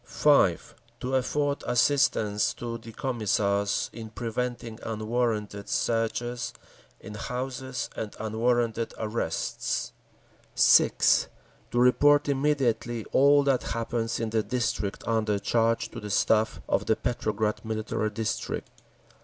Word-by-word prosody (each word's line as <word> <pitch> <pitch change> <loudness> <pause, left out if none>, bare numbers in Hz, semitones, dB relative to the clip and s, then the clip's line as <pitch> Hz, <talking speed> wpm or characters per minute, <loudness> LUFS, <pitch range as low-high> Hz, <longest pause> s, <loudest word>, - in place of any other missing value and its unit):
5. 140 - +2 0.3
To 130 +1 -3
afford 140 +2 0
assistance 115 -5 +2
to 115 -1 -5
the 115 0 -11
Commissars 100 -5 0
in 110 -1 -8
preventing 120 0 -4
unwarranted 110 -2 -2
searches 120 +1 -1 0.5
in 105 - -10
houses 125 +3 -4
and 110 -2 -5
unwarranted 115 +1 0
arrests. 110 +1 -2 0.6
6. - - +5 0.4
To 120 - 0
report 145 +4 +5
immediately 135 -5 0
all 140 +1 +5
that 135 -2 +2 0.2
happens 115 0 -2
in 115 -1 -2
the 110 -1 +2
district 110 -4 -2
under 110 -2 +1
charge 115 +2 +1
to - - -7
the 105 - -7
Staff 110 -3 +2
of - - 0
the 110 - +3
Petrograd 110 -3 -2
Military 110 -1 -2
District. 105 0 -3
115 Hz, 110 wpm, -27 LUFS, 110-125 Hz, 0.6 s, 6